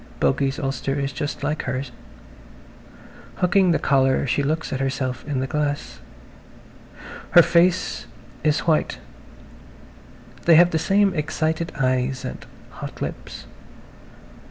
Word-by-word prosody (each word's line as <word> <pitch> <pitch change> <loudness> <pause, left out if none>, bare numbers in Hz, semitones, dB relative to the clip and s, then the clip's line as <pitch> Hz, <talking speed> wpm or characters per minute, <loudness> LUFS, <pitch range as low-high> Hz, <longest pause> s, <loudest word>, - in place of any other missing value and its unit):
Bogey's 135 - +1
ulster 135 -1 -2
is 140 -1 -2
just 145 +1 -4
like 150 +2 -1
hers. 130 0 -4 1.4
Hooking 185 +1 +3
the 165 - +3
collar 135 -2 +2
she 135 +2 0
looks 155 +3 -2
at 130 - -2
herself 130 -2 -2
in 140 -3 -1
the - - -1
glass. 145 - -3 1.3
Her - - +9
face 180 +1 +2 0.4
is 150 -1 +2
white, 160 -2 +1 1.5
they 170 - +7
have 175 +2 +6
the 160 - +1
same 195 +4 +2
excited 160 +2 -2
eyes 130 0 0
and - - -6 0.3
hot - - -8
lips. - - -6
145 Hz, 120 wpm, -23 LUFS, 135-160 Hz, 1.5 s, Her